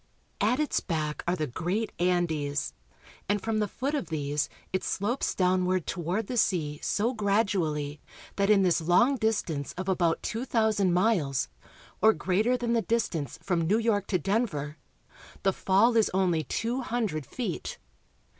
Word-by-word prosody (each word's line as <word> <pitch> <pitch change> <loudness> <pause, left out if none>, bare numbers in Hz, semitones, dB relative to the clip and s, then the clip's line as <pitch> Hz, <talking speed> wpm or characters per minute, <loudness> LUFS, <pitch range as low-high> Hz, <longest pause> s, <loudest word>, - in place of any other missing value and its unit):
( - - -14
At 250 - 0
its 305 - +1
back 155 -4 -3
are 175 - +2
the 155 -3 -1
great 175 - -2
Andes, 160 -5 0 0.6
and 205 0 +2
from 220 +2 -1
the 210 - +1
foot 270 +8 -3
of 290 - -1
'these 145 -2 -1 0.2
it 185 - 0
slopes 230 +7 -1
downward 185 -1 +2
toward 180 +5 -2
the 245 +4 -4
sea 150 -9 +1
so 230 +5 0
gradually 195 - 0 0.3
that 200 0 +1
in 205 -2 +5
this 175 -2 +2
long 205 - +4
distance 190 - -1
of 185 +1 -5
about 175 -3 +1
two 230 +3 -2
thousand 220 -6 +2
miles, 175 - +1 0.5
or 220 0 +6
greater 200 +10 +1
than 240 -1 -1
the 230 - +3
distance 180 - -1
from 175 -4 +1
New 180 +7 +2
York 220 -4 +1
to 185 - +1
Denver, 170 -6 -1 0.7
the 195 - +3
fall 200 +7 +3
is 225 -2 +4
only 175 -5 +2
two 240 +4 -2
hundred 220 - -2
feet. 225 -9 -4
190 Hz, 160 wpm, -28 LUFS, 165-225 Hz, 0.7 s, or